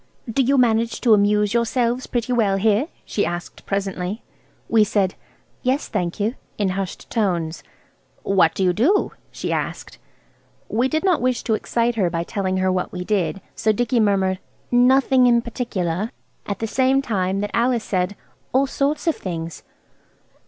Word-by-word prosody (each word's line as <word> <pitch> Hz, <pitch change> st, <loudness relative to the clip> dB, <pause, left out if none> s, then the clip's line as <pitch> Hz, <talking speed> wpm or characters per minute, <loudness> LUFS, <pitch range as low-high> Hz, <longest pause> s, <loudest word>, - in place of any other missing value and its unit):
"Do 230 Hz, +4 st, +1 dB
you 270 Hz, +2 st, +3 dB
manage 230 Hz, -2 st, +2 dB
to 235 Hz, -3 st, +5 dB
amuse 210 Hz, 0 st, +3 dB
yourself 235 Hz, +1 st, 0 dB
pretty 245 Hz, 0 st, -1 dB
well 205 Hz, -5 st, +2 dB
here?" 215 Hz, +7 st, +2 dB, 0.2 s
she 205 Hz, -, -1 dB
asked 175 Hz, 0 st, -5 dB
presently. 195 Hz, +1 st, -2 dB, 0.4 s
We 225 Hz, -2 st, +5 dB
said, 200 Hz, -2 st, +1 dB, 0.5 s
"Yes, 265 Hz, +3 st, 0 dB
thank 180 Hz, -3 st, -2 dB
you," 215 Hz, +3 st, 0 dB, 0.2 s
in 205 Hz, -2 st, +1 dB
hushed 190 Hz, 0 st, -4 dB
tones. 175 Hz, -7 st, -1 dB, 0.6 s
"What 185 Hz, -4 st, +3 dB
do 195 Hz, -, 0 dB
you 180 Hz, -1 st, +3 dB
do?" 310 Hz, -, +2 dB, 0.2 s
she -, -, -4 dB
asked. -, -, -4 dB, 0.7 s
We 240 Hz, +4 st, +1 dB
did 315 Hz, +5 st, -1 dB
not 365 Hz, -8 st, +2 dB
wish 250 Hz, -1 st, 0 dB
to 220 Hz, -, 0 dB
excite 235 Hz, +2 st, 0 dB
her 185 Hz, -5 st, +2 dB
by 170 Hz, 0 st, -2 dB
telling 190 Hz, +1 st, -2 dB
her 185 Hz, 0 st, +2 dB
what 185 Hz, -1 st, -1 dB
we 180 Hz, -1 st, -4 dB
did 195 Hz, -1 st, -1 dB
so 220 Hz, -, +1 dB
Dicky 245 Hz, +3 st, +1 dB
murmured– 190 Hz, -3 st, +2 dB, 0.3 s
"Nothing 255 Hz, +1 st, +5 dB
in 235 Hz, -1 st, +5 dB
particular," 215 Hz, -5 st, -2 dB, 0.4 s
at 200 Hz, -, -2 dB
the 225 Hz, -, -3 dB
same 265 Hz, +4 st, +2 dB
moment 195 Hz, -3 st, 0 dB
that 205 Hz, -, -3 dB
Alice 235 Hz, -1 st, +2 dB
said– 185 Hz, +1 st, -1 dB, 0.4 s
"All 265 Hz, +2 st, +4 dB
sorts 280 Hz, +2 st, -1 dB
of 330 Hz, -, +2 dB
things." 165 Hz, -3 st, -5 dB
215 Hz, 165 wpm, -22 LUFS, 190-245 Hz, 0.7 s, to